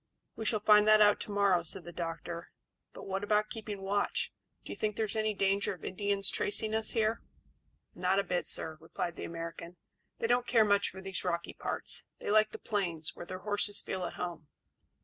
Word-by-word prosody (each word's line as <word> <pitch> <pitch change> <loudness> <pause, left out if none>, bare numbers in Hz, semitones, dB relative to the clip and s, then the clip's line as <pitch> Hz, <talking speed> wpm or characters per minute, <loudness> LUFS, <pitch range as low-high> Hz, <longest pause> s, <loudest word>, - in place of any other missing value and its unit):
"We 220 - -6
shall 215 -1 +1
find 210 0 +6
that 215 0 +7
out 205 -1 +5
to - - -5
morrow," 200 -3 +3
said 170 +2 -5
the 175 - -9
doctor. 170 0 -5 0.4
"But - - -11
what 195 +1 -3
about 210 +1 +1
keeping 210 -3 -6
watch? 200 +1 0 0.3
Do - - -7
you - - -5
think 210 -1 -2
there 220 - 0
is 210 - -2
any 215 -1 0
danger 195 0 +1
of - - -12
Indians 200 +1 +1
tracing 215 +1 +1
us 220 0 +2
here?" 225 0 +1 0.7
"Not 185 +1 0
a 200 - +3
bit, 180 -2 -1
sir," 160 -1 +3
replied 170 +1 -4
the - - -6
American. 170 +1 -7 0.4
"They - - -2
don't 245 +1 +2
care 225 -3 +4
much 200 -1 +3
for 190 - -10
these 190 0 -3
rocky 170 -1 -2
parts; - - +1
they - - -4
like 215 0 +4
the - - -8
plains, 175 -7 -2
where 175 - -9
their 185 +1 -7
horses 205 0 +3
feel 185 -1 -4
at - - -5
home." 170 -4 -6
200 Hz, 210 wpm, -31 LUFS, 180-215 Hz, 0.7 s, that